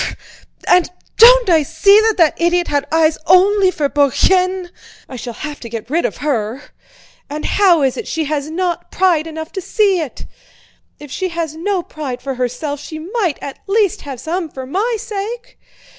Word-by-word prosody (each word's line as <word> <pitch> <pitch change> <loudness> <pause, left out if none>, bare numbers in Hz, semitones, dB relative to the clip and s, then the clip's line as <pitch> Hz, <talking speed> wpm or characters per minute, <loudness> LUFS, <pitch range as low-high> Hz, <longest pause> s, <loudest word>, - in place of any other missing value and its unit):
Fr... - - -1
fr... - - -5
fr! - - -22 0.2
And 360 -1 +4 0.3
don't - - +7
I 330 -4 +4
see 330 +8 +4
that 445 - 0
that 330 -4 +4
idiot 345 +1 +1
had 285 -1 -1
eyes 320 -1 +2
only 380 +2 +5
for 300 -5 -1
Bourienne—I 360 +3 0
shall 240 -1 -7
have 300 -1 -7
to 235 - -9
get 230 +2 -7
rid 335 +3 +1
of - - -3
her. 245 -1 -2 0.6
And 300 +1 -5
how 360 -7 +3
is 265 -2 0
it 455 - -5
she 320 - -2
has 295 0 -3
not 345 +1 -3
pride 345 -4 +1
enough 320 0 -7
to 380 - -5
see 395 -1 +1
it? 305 -6 -6 0.7
If 295 -2 -11
she 375 +5 -2
has 335 -2 -4
no 360 +2 -2
pride 280 -7 -6
for 270 +1 -4
herself 255 +4 -3
she 315 - -8
might 355 - -2
at 275 - -7
least 415 0 +1
have 275 -4 -8
some 330 +4 -3
for 265 -2 -8
my 410 - -1
sake! 460 +2 -6
325 Hz, 190 wpm, -17 LUFS, 290-380 Hz, 0.7 s, don't